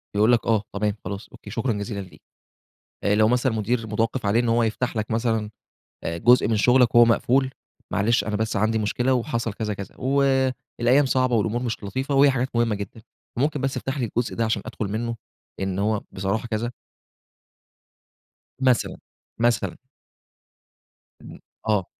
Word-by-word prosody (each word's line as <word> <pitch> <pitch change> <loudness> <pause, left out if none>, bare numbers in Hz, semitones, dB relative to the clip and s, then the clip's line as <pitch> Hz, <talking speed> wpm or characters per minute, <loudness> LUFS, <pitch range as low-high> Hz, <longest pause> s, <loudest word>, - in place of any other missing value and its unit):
يقول 105 +3 +4
لك 120 -2 +2
آه، 110 -3 +2
تمام، 105 0 0
خلاص، 100 +2 -5
أوكي، 105 - -12
شكرًا 120 +3 -1
جزيلا 100 0 -4
ليك. 95 - -13 0.8
آآ 100 - +3
لو 110 0 +4
مثلًا 125 +2 +2
مدير 110 +1 -1
متوقّف 115 +3 -1
عليه 105 +3 +3
إن 120 -1 +1
هو 115 +1 +3
يفتَح 115 +3 -1
لك 110 0 -2
مثلًا 110 -2 0 0.5
آآ 85 - -2
جزء 120 +4 +5
من 110 -1 +1
شُغلك 125 +2 +4
هو 120 0 +9
مقفول، 130 +3 +2 0.4
معلش 105 +1 +2
أنا 105 +1 -2
بس 110 +1 -1
عندي 110 +2 +2
مشكلة 120 +5 +1
وحصَل 115 -3 -1
كذا، 105 -1 -3
كذا، 100 -1 -8
والأيام 130 -1 +2
صعبة 130 -2 +2
والأمور 115 +3 0
مش 115 -3 -3
لطيفة 130 +7 -2
وهي 140 +1 +6
حاجات 130 0 -1
مهمة 115 -2 +2
جدًا، 100 +2 -7 0.4
ممكن 145 +1 0
بس 135 -1 0
تفتَحلي 135 -1 -2
الجزء 115 +2 -2
ده 115 - 0
علشان 110 -2 0
أدخُل 105 - -4
منه 115 +3 -2 0.4
لإن 95 -1 -2
هو 105 +1 +1
بصراحة 100 +5 -2
كذا. 115 +1 -2 1.9
مثلًا، 130 -3 +2 0.4
مثلًا. 120 0 +1 1.4
إمم. - - -11 0.3
آه. 105 -4 +2
115 Hz, 160 wpm, -24 LUFS, 105-125 Hz, 1.9 s, هو